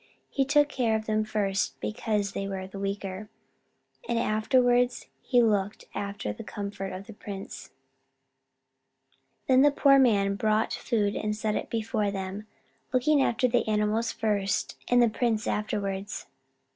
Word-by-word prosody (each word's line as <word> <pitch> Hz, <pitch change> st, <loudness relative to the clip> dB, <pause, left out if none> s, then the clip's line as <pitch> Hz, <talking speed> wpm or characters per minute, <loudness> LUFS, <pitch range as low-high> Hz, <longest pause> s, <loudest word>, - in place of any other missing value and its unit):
He 270 Hz, -, +1 dB
took 290 Hz, +1 st, +4 dB
care 245 Hz, -6 st, 0 dB
of 220 Hz, 0 st, -2 dB
them 215 Hz, 0 st, +1 dB
first, 205 Hz, -2 st, -1 dB
because 215 Hz, -2 st, -1 dB
they 195 Hz, 0 st, -3 dB
were 190 Hz, -1 st, -4 dB
the 195 Hz, +1 st, -9 dB
weaker, 195 Hz, 0 st, -4 dB, 0.8 s
and 235 Hz, -, +1 dB
afterwards 245 Hz, +3 st, +2 dB, 0.2 s
he 245 Hz, -2 st, +3 dB
looked 205 Hz, -2 st, 0 dB
after 200 Hz, -, -4 dB
the -, -, -9 dB
comfort 200 Hz, -1 st, -5 dB
of 185 Hz, +1 st, -7 dB
the 225 Hz, -, -10 dB
prince. 200 Hz, -1 st, -8 dB, 1.8 s
Then 260 Hz, 0 st, +5 dB
the 290 Hz, -, +7 dB
poor 275 Hz, -1 st, +5 dB
man 200 Hz, -6 st, +3 dB
brought 215 Hz, +1 st, +1 dB
food 210 Hz, -4 st, 0 dB
and 210 Hz, 0 st, -1 dB
set 215 Hz, 0 st, -1 dB
it -, -, -3 dB
before 220 Hz, -2 st, -1 dB
them, 195 Hz, +2 st, -5 dB, 0.4 s
looking 275 Hz, +3 st, +3 dB
after 250 Hz, 0 st, +2 dB
the 245 Hz, -1 st, +1 dB
animals 215 Hz, +2 st, +1 dB
first 205 Hz, -3 st, -1 dB
and 245 Hz, 0 st, +5 dB
the -, -, +5 dB
prince 220 Hz, -1 st, 0 dB
afterwards. 205 Hz, -1 st, -3 dB
215 Hz, 145 wpm, -27 LUFS, 200-240 Hz, 1.8 s, the